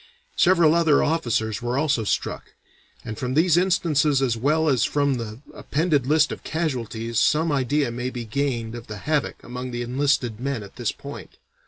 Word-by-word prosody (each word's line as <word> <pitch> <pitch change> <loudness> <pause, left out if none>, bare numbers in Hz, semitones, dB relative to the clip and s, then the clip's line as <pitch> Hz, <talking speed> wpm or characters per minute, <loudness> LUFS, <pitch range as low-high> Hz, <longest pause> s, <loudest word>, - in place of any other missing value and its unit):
Several 170 -4 +5
other 165 -3 +4
officers 120 -9 0
were 120 +2 -1
also 140 -5 +1
struck; 105 - -3 0.5
and 110 -1 -6
from 130 0 -2
these 165 +1 +4
instances 160 -6 +2
as 130 -4 +1
well 150 +7 +1
as 130 -6 +3
from 140 -1 +1
the 115 +1 -7
appended 150 -4 0
list 150 +1 +3
of - - -7
casualties 115 -8 -2
some 160 +2 +2
idea 140 -1 +1
may 125 +2 -3
be 120 -2 -6
gained 120 -2 -2
of 120 -1 -8
the 105 - -7
havoc 150 +6 -2
among 125 +1 -6
the 120 0 -3
enlisted 125 -3 0
men 135 -3 -3
at 100 - -13
this - - -1
point. - - -10
135 Hz, 175 wpm, -24 LUFS, 120-155 Hz, 0.5 s, Several